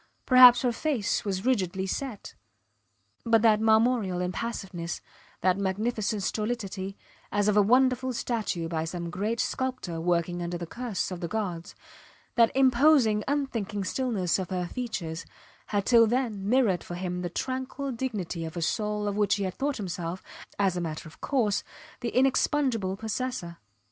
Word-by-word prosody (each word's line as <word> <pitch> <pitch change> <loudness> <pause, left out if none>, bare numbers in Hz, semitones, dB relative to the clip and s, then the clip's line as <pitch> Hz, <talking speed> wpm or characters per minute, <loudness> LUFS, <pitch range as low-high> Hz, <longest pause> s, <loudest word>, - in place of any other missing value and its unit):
Perhaps 250 -1 +8
her 250 - +2
face 235 -4 -1
was 195 0 -3
rigidly 190 -7 +1
set 235 +2 -5 0.9
but 230 -1 +3
that 215 -2 +5
marmoreal 220 -4 +3
impassiveness, 180 -3 -4 0.4
that 185 +2 +2
magnificent 210 +1 -1
stolidity, 200 -3 -3 0.3
as 205 0 +1
of 210 - +3
a 210 - +6
wonderful 255 +4 +3
statue 220 -8 -2
by 160 -1 -2
some 170 +1 -5
great 210 +6 -2
sculptor 255 -11 -2
working 175 0 0
under 175 0 -3
the 170 - -5
curse 230 0 -3
of 180 - -5
the 170 - -3
gods; 180 -5 -4 0.6
that 230 -1 +4
imposing, 260 -4 +4
unthinking 235 -8 -1
stillness 200 -6 0
of 185 - -4
her 180 -1 -1
features, 175 -7 -4 0.4
had 200 -2 -1
till 230 -2 +6
then 220 -5 -1
mirrored 230 -8 +3
for 175 - -7
him 180 0 -3
the 175 - -3
tranquil 260 - -3
dignity 215 -9 -3
of 160 +1 -6
a - - -2
soul 210 +3 -1
of 200 - -1
which 205 -1 +2
he 200 - -2
had 185 -1 -2
thought 280 +4 -2
himself 180 -3 -4 0.3
as 195 -3 +2
a 175 - -2
matter 160 -1 -5
of 155 - -16
course 230 -8 +1 0.4
the 240 -2 -2
inexpugnable 255 -6 +1
possessor. 220 -5 -4
210 Hz, 155 wpm, -27 LUFS, 180-245 Hz, 0.9 s, Perhaps